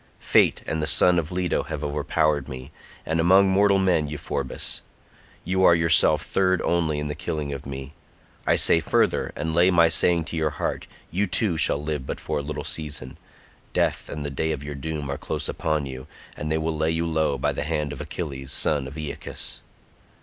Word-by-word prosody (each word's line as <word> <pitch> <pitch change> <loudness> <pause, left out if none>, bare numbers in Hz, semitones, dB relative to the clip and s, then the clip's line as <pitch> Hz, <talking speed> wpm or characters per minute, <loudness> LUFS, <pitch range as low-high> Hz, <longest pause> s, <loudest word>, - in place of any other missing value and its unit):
Fate - - +3
and 80 - -2
the 75 - -1
son 90 +3 +5
of 80 0 -4
Leto 90 -1 0
have 75 0 -6
overpowered 75 -1 0
me, 65 -1 -8 0.3
and 80 +1 -1
among 95 +4 +5
mortal 100 +1 +4
men 90 -5 +2
Euphorbus; 70 -2 -4 0.6
you 95 +2 0
are 85 - +7
yourself 85 0 +5
third 95 -1 +1
only 80 -3 +1
in 75 0 -3
the 75 - -3
killing 75 -1 -4
of 70 0 -7
me. 70 +1 -7 0.5
I - - +4
say 85 - +5
further, 80 - +1
and 80 +1 -3
lay 85 +2 +4
my 85 -2 +5
saying 85 0 +3
to 80 - -6
your 80 -1 +1
heart, - - -4 0.2
you 100 +4 0
too 90 +1 +2
shall 80 - +3
live 75 -2 -4
but - - -4
for 75 -1 -3
a - - -2
little 75 0 -5
season; 75 -4 -3 0.5
death - - 0
and 75 0 -5
the 70 - -3
day 80 +4 -1
of 75 -3 -4
your 75 0 -5
doom 75 +1 -4
are 70 0 -4
close 75 0 -3
upon 80 -6 -1
you, 65 -1 -8 0.3
and 75 +1 -4
they 80 - +2
will 80 0 -2
lay 80 +1 0
you 80 +1 0
low 80 -3 0
by - - 0
the - - -3
hand 75 -2 -2
of 70 - -7
Achilles 70 -5 -5
son 75 -4 +1
of 70 +4 -9
Aeacus." 75 -2 -5
80 Hz, 200 wpm, -24 LUFS, 75-85 Hz, 0.6 s, are